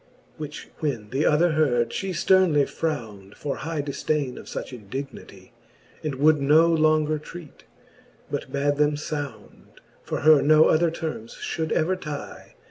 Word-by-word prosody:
Which 150 Hz, -1 st, -7 dB
when 120 Hz, -9 st, -3 dB
the 135 Hz, +4 st, +1 dB
other 165 Hz, +3 st, +3 dB
heard, 130 Hz, -7 st, +1 dB
ftie 195 Hz, -1 st, -3 dB
fternly 175 Hz, -6 st, +4 dB
frownd 110 Hz, -13 st, -5 dB
For 145 Hz, -2 st, -4 dB
high 155 Hz, -1 st, -3 dB
diidaine 140 Hz, -1 st, -2 dB
of -, -, -10 dB
fuch -, -, -6 dB
indignity, 125 Hz, +5 st, -8 dB, 0.5 s
And 150 Hz, -3 st, -3 dB
would 150 Hz, +2 st, +3 dB
no 160 Hz, +4 st, +5 dB
lenger 155 Hz, -1 st, +2 dB
treat, 155 Hz, 0 st, -12 dB, 0.7 s
but -, -, -4 dB
bad 145 Hz, +1 st, 0 dB
them 150 Hz, 0 st, +2 dB
found; 145 Hz, -4 st, -7 dB, 0.2 s
For -, -, -4 dB
her 155 Hz, -1 st, +6 dB
no 155 Hz, +1 st, +6 dB
other 165 Hz, +2 st, +3 dB
termes 160 Hz, -8 st, -6 dB
ftiould 160 Hz, -1 st, -4 dB
ever 180 Hz, +4 st, +1 dB
tie. 150 Hz, -5 st, -8 dB
150 Hz, 145 wpm, -24 LUFS, 140-155 Hz, 0.7 s, her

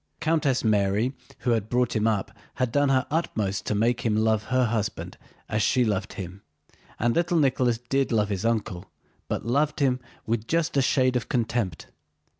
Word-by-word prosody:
Countess 155 Hz, -5 st, +1 dB
Mary 105 Hz, +3 st, +2 dB, 0.3 s
who 125 Hz, -, +1 dB
had 110 Hz, -2 st, 0 dB
brought 125 Hz, -1 st, +1 dB
him 110 Hz, 0 st, +2 dB
up 105 Hz, -3 st, 0 dB, 0.2 s
had 125 Hz, -2 st, 0 dB
done 145 Hz, +2 st, +2 dB
her 130 Hz, -1 st, +2 dB
utmost 105 Hz, -, -1 dB
to 105 Hz, -, 0 dB
make 115 Hz, +3 st, +1 dB
him 110 Hz, -2 st, +1 dB
love 110 Hz, 0 st, +2 dB
her 130 Hz, -1 st, +2 dB
husband 110 Hz, -2 st, -2 dB, 0.3 s
as 110 Hz, 0 st, -1 dB
she 125 Hz, +2 st, +3 dB
loved 100 Hz, -3 st, -1 dB
him, 95 Hz, +1 st, -7 dB, 0.6 s
and 120 Hz, +1 st, +1 dB
little 175 Hz, 0 st, +2 dB
Nicholas 130 Hz, -5 st, +2 dB
did 130 Hz, +3 st, -1 dB
love 105 Hz, -3 st, +2 dB
his 100 Hz, -1 st, -2 dB
uncle, 110 Hz, -5 st, -1 dB, 0.4 s
but -, -, -3 dB
loved 145 Hz, +6 st, +1 dB
him 130 Hz, -3 st, +2 dB, 0.3 s
with 115 Hz, 0 st, -2 dB
just 165 Hz, -2 st, 0 dB
a 140 Hz, -, +4 dB
shade 130 Hz, -1 st, +2 dB
of 125 Hz, -, -2 dB
contempt. 115 Hz, -, -1 dB
115 Hz, 180 wpm, -26 LUFS, 105-130 Hz, 0.6 s, a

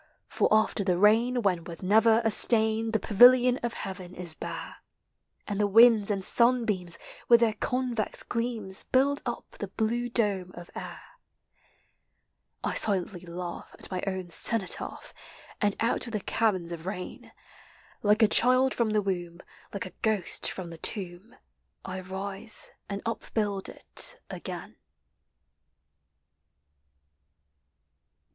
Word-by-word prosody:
For -, -, +1 dB
after 215 Hz, -1 st, +2 dB
the 180 Hz, -2 st, +1 dB
rain, 230 Hz, +5 st, +3 dB
when, 180 Hz, -4 st, +1 dB
with 170 Hz, +2 st, -10 dB
never 220 Hz, +4 st, +4 dB
a 225 Hz, -, +3 dB
stain, 220 Hz, 0 st, +4 dB
The 220 Hz, -, +1 dB
pavilion 245 Hz, +5 st, +6 dB
of 235 Hz, -1 st, -3 dB
heaven 185 Hz, -2 st, -7 dB
is 175 Hz, -3 st, -8 dB
hare -, -, -6 dB, 0.7 s
And 205 Hz, -1 st, -3 dB
the 205 Hz, -, +3 dB
winds 225 Hz, 0 st, +6 dB
and 195 Hz, -2 st, 0 dB
sunbeams, 225 Hz, -8 st, +2 dB, 0.3 s
with 235 Hz, -1 st, +6 dB
their 225 Hz, -2 st, +3 dB
COnves 245 Hz, 0 st, -2 dB
gleams, 230 Hz, -5 st, -3 dB
Build 280 Hz, +2 st, +3 dB
up 240 Hz, -, -4 dB
the 205 Hz, -, -4 dB
blue 230 Hz, +4 st, -2 dB
dome 200 Hz, -6 st, -1 dB
of 175 Hz, 0 st, -11 dB
air. -, -, -8 dB, 1.6 s
I -, -, -1 dB
silently 190 Hz, -3 st, +1 dB
laugh 175 Hz, +1 st, -6 dB
at -, -, -5 dB
my 185 Hz, -, -2 dB
own 185 Hz, -2 st, -4 dB
cenotaph, 210 Hz, +1 st, 0 dB, 0.5 s
And 205 Hz, -2 st, +2 dB
out 230 Hz, +1 st, 0 dB
of 235 Hz, -, -8 dB
the 215 Hz, -, 0 dB
caverns 190 Hz, -7 st, 0 dB
of 170 Hz, +1 st, -7 dB
rain. 185 Hz, -2 st, -7 dB, 0.7 s
Like 210 Hz, +2 st, +3 dB
a -, -, +7 dB
child 255 Hz, +4 st, +3 dB
from 235 Hz, -2 st, 0 dB
the 210 Hz, -1 st, +1 dB
womb, 175 Hz, -3 st, -3 dB, 0.3 s
like 200 Hz, -, -5 dB
a 185 Hz, -, -10 dB
ghost 215 Hz, -5 st, 0 dB
from 175 Hz, -3 st, -7 dB
the 165 Hz, -, -10 dB
tomb, 190 Hz, +3 st, -5 dB, 0.5 s
I 185 Hz, 0 st, -5 dB
rise 195 Hz, +3 st, -6 dB, 0.2 s
and 200 Hz, 0 st, -5 dB
upbuild 210 Hz, -3 st, -3 dB
it -, -, -4 dB
again. -, -, -8 dB
210 Hz, 135 wpm, -28 LUFS, 185-230 Hz, 1.6 s, a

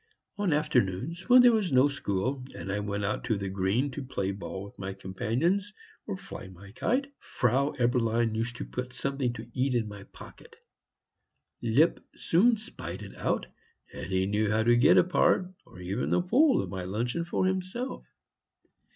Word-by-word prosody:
On 205 Hz, -4 st, 0 dB
afternoons 150 Hz, -, 0 dB
when 250 Hz, 0 st, +9 dB
there 245 Hz, -, +8 dB
was 215 Hz, -6 st, +1 dB
no 130 Hz, +2 st, +5 dB
school, 130 Hz, -1 st, -2 dB
and 90 Hz, +3 st, -5 dB
I 100 Hz, -, -1 dB
went 100 Hz, 0 st, -2 dB
out 100 Hz, -, -2 dB
on 110 Hz, -, +2 dB
the 100 Hz, -1 st, -3 dB
green 100 Hz, +9 st, 0 dB
to 135 Hz, -, -5 dB
play 100 Hz, -7 st, -2 dB
ball 95 Hz, 0 st, -6 dB
with 100 Hz, -, -13 dB
my 95 Hz, 0 st, -5 dB
companions 130 Hz, -, -1 dB, 0.4 s
or 200 Hz, -3 st, -3 dB
fly 140 Hz, -, -9 dB
my 95 Hz, +2 st, -13 dB
kite, 270 Hz, -, -1 dB
Frau 130 Hz, +4 st, 0 dB
Eberlein 120 Hz, -2 st, +1 dB
used 115 Hz, +2 st, -2 dB
to -, -, -5 dB
put 125 Hz, 0 st, -5 dB
something 135 Hz, -1 st, -1 dB
to 115 Hz, -2 st, -8 dB
eat 130 Hz, 0 st, 0 dB
in 115 Hz, -3 st, +1 dB
my 100 Hz, -1 st, -9 dB
pocket. -, -, -14 dB, 1.1 s
Lipp 130 Hz, +9 st, +3 dB
soon 225 Hz, +8 st, +3 dB
spied 95 Hz, -, -7 dB
it 100 Hz, -, -10 dB
out, -, -, -1 dB, 0.5 s
and -, -, -6 dB
he 95 Hz, 0 st, +1 dB
knew 105 Hz, +2 st, +1 dB
how 110 Hz, +1 st, +2 dB
to 120 Hz, +1 st, +5 dB
get 120 Hz, -, +6 dB
a -, -, +7 dB
part, 180 Hz, +1 st, +2 dB
or 90 Hz, -, -14 dB
even 95 Hz, +6 st, -2 dB
the -, -, +3 dB
whole 255 Hz, -, +4 dB
of -, -, -7 dB
my 95 Hz, -1 st, -4 dB
luncheon 120 Hz, -, -2 dB
for 175 Hz, +2 st, -1 dB
himself. 190 Hz, +7 st, -2 dB
125 Hz, 180 wpm, -28 LUFS, -, 1.1 s, when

